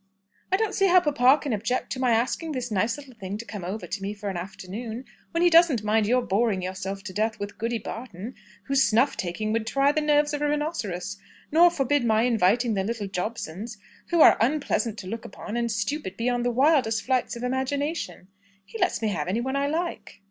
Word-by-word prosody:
"I 380 - +4
don't 440 +1 0
see 390 - +3
how 365 0 +7
papa 280 -4 +4
can 280 -5 -1
object 225 +4 -2
to 260 - -3
my 255 -1 +2
asking 255 +8 0
this 250 -3 -4
nice 215 +5 +1
little 275 -3 -12
thing 200 -2 -6
to 230 - -8
come 205 -2 -7 0.2
to 205 -2 -6
me 200 +2 -4
for 205 -1 -5
an - - -7
afternoon, 195 +7 -6 0.2
when 335 +1 0
he 350 - +6
doesn't 325 -9 +5
mind 210 0 +2
your 250 +2 +3
boring 200 -2 +1
yourself 190 +1 -5
to 195 -3 -7
death 215 +2 -1
with 205 0 -6
Goody 230 +1 -1
Barton, 225 -1 -7 0.3
whose 275 0 +2
snuff 230 +6 +3
taking 195 +5 -2
would 225 -1 -1
try 275 +4 +3
the 310 - 0
nerves 295 0 +2
of 290 - -2
a 295 - +1
rhinoceros, 205 - -2 0.3
nor 340 +3 +7
forbid 285 -4 +1
my 220 -1 +3
inviting 230 0 +2
the 195 -2 0
little 215 -1 -3
Jobsons, 200 +1 -5 0.3
who 340 -2 +3
are - - +8
unpleasant 245 -4 0
to 195 -3 -7
look 225 +3 -5
upon, 210 +2 -7
and 235 -1 0
stupid 215 0 -3
beyond 245 +1 0
the - - +3
wildest 255 -4 +3
flights 255 -2 0
of 235 - -7
imagination. 265 - -2 0.4
He 220 +3 -9
lets 225 - +1
me 220 - +2
have 165 -6 -2
any 195 +5 0
one 265 +3 -2
I 280 0 +1
like." 335 +4 -3
235 Hz, 215 wpm, -26 LUFS, 205-275 Hz, 0.4 s, are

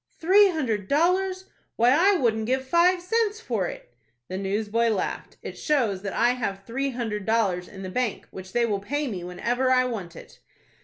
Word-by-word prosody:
"Three 390 +4 +6
hundred 230 - -2
dollars! 370 - +1 0.3
Why, 240 +2 +4
I 370 +8 +4
wouldn't 220 -6 0
give 260 +1 0
five 350 +4 +4
cents 435 +2 0
for 225 - -2
it." 120 - -10 0.4
The 185 - -4
newsboy 210 +4 0
laughed. 215 -4 -3
"It - - -7
shows 235 -11 0
that 195 -1 -4
I 240 +1 +3
have 200 -6 -3
three 270 +4 -2
hundred 225 -5 -3
dollars 200 -6 +1
in 195 -1 -10
the 185 - -5
bank, 250 -1 -2
which 185 0 -9
they 240 +2 +2
will 205 -3 -1
pay 290 +9 -2
me 190 -7 -5
whenever 235 +9 -1
I 255 0 +4
want 195 -9 -5
it." - - -13
235 Hz, 190 wpm, -25 LUFS, 200-295 Hz, 0.4 s, Three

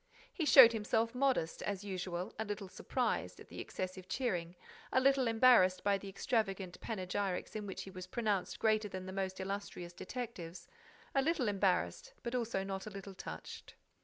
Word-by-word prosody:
He 330 - -1
showed 245 -6 +10
himself 225 +1 +1
modest, 250 -11 +1
as 200 -1 -3
usual, 185 -2 -4
a - - +1
little 205 -2 -4
surprised - - -2
at - - -13
the - - -8
excessive 185 0 -5
cheering, 180 -9 -1 0.4
a - - +4
little 270 -1 +4
embarrassed 225 -5 +5
by 200 -1 +2
the 200 - -8
extravagant 195 -3 -1
panegyrics 190 -2 -2
in 210 -1 -4
which 190 - -5
he 195 - -9
was 185 -1 -8
pronounced 205 -3 -1
greater 215 -1 +2
than 185 -1 -6
the 190 - -6
most 190 -1 -2
illustrious 190 -2 -5
detectives—a 185 +3 -6
little 300 -4 +1
embarrassed, 205 - 0
but 235 - -3
also 230 -6 0
not 195 +1 -4
a - - -3
little 195 -1 -8
touched. 185 - -8
200 Hz, 165 wpm, -35 LUFS, 185-230 Hz, 0.4 s, showed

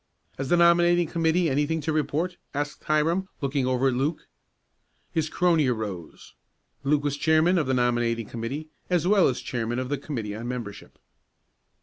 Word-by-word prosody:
"Has 135 -1 -3
the 175 - +4
nominating 175 0 +5
committee 165 +1 +1
anything 150 +3 0
to 155 +2 -2
report?" 155 +4 -1 0.2
asked 145 +1 -4
Hiram, 165 +5 +1
looking 140 -2 -1
over 130 +1 +2
at - - -1
Luke. 145 +6 -1 0.9
His 160 -1 -1
crony 170 -5 +2
arose. 105 -9 -5 0.5
Luke 145 +1 +2
was 145 -1 -1
chairman 160 +4 +3
of 150 - -1
the 130 - +1
nominating 120 -2 +1
committee, 125 +8 -5 0.2
as 175 -2 +1
well 200 -2 +5
as 130 - -1
chairman 120 -1 -3
of 130 0 -3
the 145 -2 -1
committee 115 -8 -4
on 115 +2 -6
membership. 120 -5 -7
145 Hz, 160 wpm, -26 LUFS, 125-165 Hz, 0.9 s, nominating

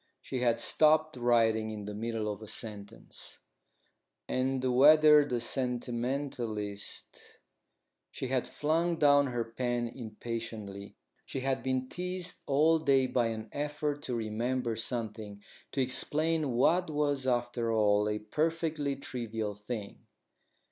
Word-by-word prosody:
She 130 - -4
had 120 -2 +2
stopped 155 0 +3
writing 115 -3 +2
in 105 -2 -6
the 105 - -5
middle 110 0 -3
of 105 - -12
a 110 - -9
sentence: 105 0 -6 0.9
"And, 130 0 0
whether 150 +2 +8
the 125 -4 -2
sentimentalist 120 -4 -3 0.3
" - - -53
She 130 - -5
had 130 -1 0
flung 165 +3 0
down 145 -2 +5
her 120 -2 -1
pen 120 +1 -2
impatiently. 110 -3 -6 0.3
She 135 - -4
had 135 0 0
been 130 -1 -1
teased 180 +2 -3
all 155 +4 +4
day 135 -4 +3
by 125 -2 +1
an 110 -1 -5
effort 150 0 -2
to 125 - -2
remember 115 +2 -1
something 110 -3 -3 0.3
to 135 - 0
explain 155 +4 0
what 170 +9 +3
was 145 -3 0
after 120 -2 0
all 105 -1 +3
a 105 - -1
perfectly 155 +4 -1
trivial 115 -6 -4
thing. 105 0 -7
125 Hz, 125 wpm, -31 LUFS, 110-145 Hz, 0.9 s, whether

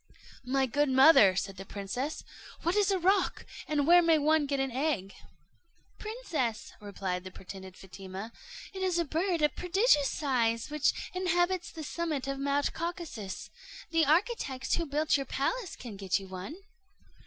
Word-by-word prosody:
"My 270 +1 +2
good 290 +3 +1
mother," 265 - +7
said 195 +1 -3
the 195 - -6
princess, 205 +10 -4 0.4
"what 340 +3 +1
is 415 -1 +3
a 390 - +2
roc, 380 +2 +1 0.2
and 295 -2 +1
where 350 +3 +7
may 330 -2 +4
one 305 0 +2
get 280 -1 -1
an 270 -1 -1
egg?" 245 -8 -1 0.9
"Princess," 350 - -3
replied 190 -3 -4
the 185 - -7
pretended 190 0 -10
Fatima, 190 +3 -8 0.4
"it 380 - -6
is 370 -2 +1
a 340 - +1
bird 330 +2 0
of 300 - +2
prodigious 360 - +3
size, 235 -4 0
which 300 -1 0
inhabits 360 0 +1
the 320 - -7
summit 300 -2 -3
of 275 0 -3
Mount 280 +1 0
Caucasus; 330 - -5 0.4
the 330 -1 +3
architect 310 - +1
who 335 -1 0
built 300 +2 +2
your 275 -2 -4
palace 375 - -2
can 230 -5 -9
get 195 -2 0
you 195 -1 -8
one." 190 - -7
285 Hz, 160 wpm, -30 LUFS, 225-340 Hz, 0.9 s, mother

